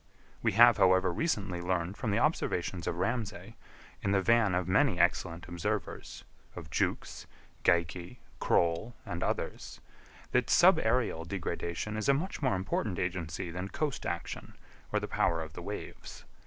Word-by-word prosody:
We - - +1
have, 120 +3 +7
however, 95 -2 +4
recently 95 - -1
learned 90 +1 -1
from 115 +1 -3
the 105 - +1
observations 95 - 0
of - - -1
Ramsay, 115 +2 -3 0.5
in 100 - 0
the 100 - +3
van 115 -3 +4
of 90 -1 -1
many 90 - +3
excellent 85 0 +1
observers—of 85 -1 -6
Jukes, - - -2 0.4
Geikie, 85 +5 +1 0.2
Croll 85 +8 +1
and 85 - -4
others, - - -3 0.5
that - - +2
subaërial 110 -8 +4
degradation 85 +2 -3
is 110 - -1
a 140 - +6
much 175 +4 -3
more 130 -6 +2
important 95 0 -2
agency 85 -2 -3
than 90 +3 -4
coast 145 +5 -3
action, - - -5 0.4
or - - +2
the - - -4
power 85 - +1
of 80 -1 -6
the - - -7
waves. - - -8
95 Hz, 145 wpm, -31 LUFS, 85-110 Hz, 0.5 s, have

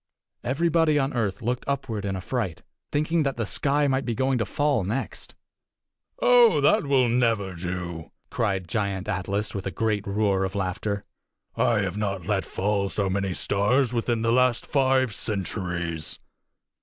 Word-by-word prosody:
Everybody 160 +4 +2
on 135 -1 0
earth 105 -4 -1
looked 125 +2 -1
upward 125 -7 -2
in 95 -1 -1
affright, 95 -2 -3 0.3
thinking 155 +3 +1
that 135 -4 -1
the 115 - -1
sky 145 +7 +1
might 135 0 +1
be 115 - -2
going 130 0 +1
to 110 - 0
fall 145 -5 +1
next. 110 +9 -4 0.8
"Oh, - - +6
that 210 -8 +3
will 130 -3 +4
never 115 -5 +1
do!" 85 -2 -5 0.2
cried 95 -5 -1
Giant 100 -1 -2
Atlas 100 +3 -2
with 100 -1 -4
a - - 0
great 105 +1 -1
roar 100 -1 +1
of 95 +1 -3
laughter. 100 +1 -2 0.5
"I 115 -4 +2
have 95 0 -2
not 100 -4 -2
let 100 -2 0
fall 100 0 -1
so 100 -2 -1
many 95 -1 -1
stars 120 +6 +1
within 115 -1 0
the 115 - +2
last 125 -1 +3
five 130 -4 +2
centuries. 90 -7 -3
110 Hz, 155 wpm, -25 LUFS, 95-130 Hz, 0.8 s, Oh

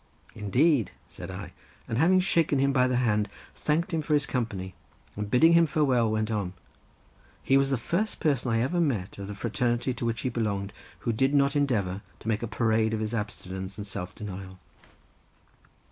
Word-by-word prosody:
"Indeed," 115 - +2 0.2
said - - -9
I, - - -7 0.3
and 115 - -1
having 185 +4 +5
shaken 165 -6 +2
him 140 +1 +2
by 125 -1 +4
the 125 - 0
hand, 105 -4 +1 0.2
thanked 165 +4 -1
him 160 - +1
for 150 0 +1
his 145 -2 +2
company, 100 -7 -3 0.4
and 105 0 -4
bidding 160 +9 +6
him 170 -1 +6
farewell, 135 -6 +2
went 110 0 0
on. 100 -4 -2 0.9
He 135 - +3
was 135 0 +4
the 135 - +1
first 180 - -2
person 130 -5 +1
I 115 - +2
had 115 - +2
ever 175 -1 +2
met 110 - -1
of 100 - -5
the 105 - -6
fraternity 120 +4 0
to 125 - -6
which 115 -1 -2
he 130 - -1
belonged, 100 -4 -2 0.3
who 115 - 0
did 135 +5 +2
not 140 0 +3
endeavour 105 -10 0 0.2
to - - -11
make 110 -1 0
a 115 - -2
parade 110 -1 +1
of - - -3
his 110 +1 -3
abstinence 95 -3 -5
and 105 - -5
self 90 -2 -6
denial. 95 -3 -7
115 Hz, 190 wpm, -27 LUFS, 105-140 Hz, 0.9 s, bidding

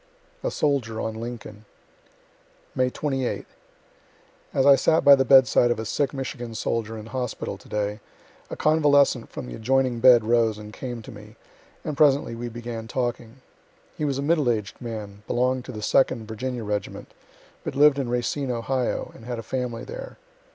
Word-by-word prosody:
A - - -1
SOLDIER 130 -7 0
ON 110 - -2
LINCOLN 115 -2 -8 1.1
May 130 -1 +1
28. 135 -2 -2 1.1
As 135 - +1
I 140 -1 +8
sat 160 +4 +2
by 140 - +10
the 135 -1 +5
bedside 130 -2 +5
of 120 - +1
a 110 - -4
sick 140 +5 0
Michigan 120 -4 -5
soldier 115 0 -2
in 110 - -8
hospital 125 0 -4
to - - -17
day, 105 0 -2 0.5
a - - -5
convalescent 145 -5 +3
from - - -7
the - - -8
adjoining 130 - +1
bed 120 -2 +7
rose 115 -1 +2
and 105 0 -10
came 120 -2 -6
to - - -10
me, 105 0 -13 0.5
and 150 - -3
presently 140 -4 +3
we 120 +1 -5
began 115 -1 -6
talking. 120 0 -4 0.5
He - - -5
was 140 -3 0
a 140 - -2
middleaged 125 - 0
man, 105 -4 -7
belonged 125 +1 0
to 130 - -7
the 105 -3 -7
2d 115 0 +2
Virginia 120 +2 -4
regiment, 105 -1 -4 0.5
but - - -5
lived 145 0 +5
in 130 -3 -2
Racine, 125 +3 -1
Ohio, 125 +1 -2
and 115 - -14
had 120 -1 -4
a 115 - -6
family 125 0 -3
there. - - -8
120 Hz, 170 wpm, -25 LUFS, 110-135 Hz, 1.1 s, by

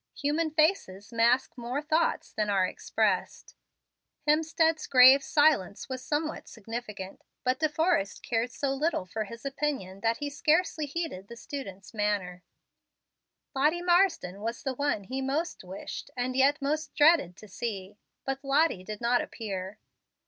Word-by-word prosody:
Human 310 +3 0
faces 305 - 0
mask 235 +3 +2
more 240 +4 -2
thoughts 315 +2 0
than 210 -1 -1
are 195 -2 +3
expressed. 200 +1 -1 0.7
Hemstead's 320 +1 +2
grave 260 +1 +8
silence 285 -9 +2
was 255 -1 -5
somewhat 310 +1 -2
significant; 215 -3 -7 0.2
but 255 0 +1
De 310 0 +2
Forrest 315 - 0
cared 235 +1 -1
so 275 +2 -1
little 295 - 0
for 215 +4 -4
his 230 +5 -11
opinion 275 -9 -3
that 225 +2 +1
he 290 - -3
scarcely 305 +2 +1
heeded 285 - -4
the 235 - -10
student's 200 -8 -8
manner. 205 -4 -1 1.1
Lottie 305 +6 +1
Marsden 345 - +2
was 230 +2 -4
the 270 -2 -1
one 285 -6 -1
he 260 +7 -4
most 290 - -2
wished, 185 +1 -7
and 250 +1 -1
yet 275 +2 +4
most 305 +2 -2
dreaded 295 - +4
to 215 - -13
see. 205 -1 -5 0.3
But 270 +1 -3
Lottie 275 - +2
did 210 +3 -7
not 240 +1 +3
appear. 195 -3 -6
255 Hz, 145 wpm, -28 LUFS, 210-300 Hz, 1.1 s, grave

